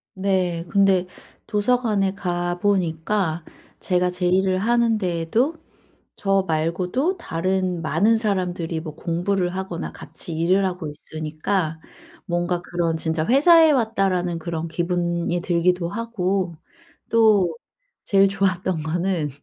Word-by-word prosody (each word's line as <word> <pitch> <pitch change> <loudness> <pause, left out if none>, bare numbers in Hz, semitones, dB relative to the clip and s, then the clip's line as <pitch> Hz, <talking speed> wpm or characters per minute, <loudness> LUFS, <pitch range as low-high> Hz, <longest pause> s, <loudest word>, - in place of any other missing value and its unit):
네. 185 -3 0
근데 195 -2 +3 0.4
도서관에 210 -3 +1
가 175 -2 -2
보니까 175 -2 0 0.4
제가 180 -1 +1
제 180 0 -1
일을 185 +1 +2
하는데도 225 - +1 0.6
저 195 -1 +1
말고도 180 - 0
다른 185 - -1
많은 200 +8 +2
사람들이 180 -6 -1
뭐 155 -2 -8
공부를 180 +2 -1
하거나 190 -3 -4
같이 170 - -9
일을 185 +4 +2
하고 180 -4 -3
있으니까 155 +3 -3 0.5
뭔가 175 -1 -1
그런 170 -2 -1
진짜 160 0 -1
'회사에 320 - +6
왔다.'라는 195 - 0
그런 165 0 -4
기분이 175 +1 -1
들기도 175 0 +1
하고 195 -5 -2 0.5
또 210 -7 +4 0.5
제일 195 -1 +4
좋았던 185 -4 0
거는 170 -1 -1
180 Hz, 245 characters per minute, -22 LUFS, 170-200 Hz, 0.6 s, 회사에